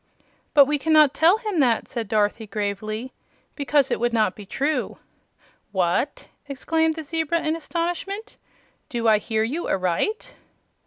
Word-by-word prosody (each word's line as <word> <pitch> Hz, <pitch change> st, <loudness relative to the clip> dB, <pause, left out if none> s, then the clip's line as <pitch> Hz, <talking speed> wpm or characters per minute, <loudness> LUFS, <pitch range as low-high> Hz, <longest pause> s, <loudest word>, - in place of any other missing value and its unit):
"But 285 Hz, -2 st, +8 dB
we 295 Hz, +1 st, 0 dB
cannot 305 Hz, -1 st, +5 dB
tell 340 Hz, +6 st, +4 dB
him 425 Hz, -6 st, -3 dB
that," 240 Hz, -5 st, +2 dB
said 230 Hz, -4 st, -4 dB
Dorothy, 210 Hz, +1 st, 0 dB
gravely, 215 Hz, +4 st, -4 dB, 0.4 s
"because 285 Hz, -1 st, +1 dB
it -, -, 0 dB
would 240 Hz, 0 st, 0 dB
not 215 Hz, -5 st, +2 dB
be 205 Hz, -2 st, -11 dB
true." 285 Hz, +8 st, -2 dB, 0.7 s
"What!" 185 Hz, +8 st, -1 dB, 0.2 s
exclaimed 320 Hz, +4 st, 0 dB
the 320 Hz, -, -6 dB
zebra, 325 Hz, +2 st, -1 dB
in 310 Hz, +1 st, +1 dB
astonishment; 350 Hz, +6 st, -4 dB, 0.5 s
"do 235 Hz, -2 st, -1 dB
I 215 Hz, -1 st, +5 dB
hear 220 Hz, 0 st, -1 dB
you 285 Hz, +10 st, -3 dB
aright?" 185 Hz, -, -1 dB
275 Hz, 145 wpm, -23 LUFS, 220-320 Hz, 0.7 s, But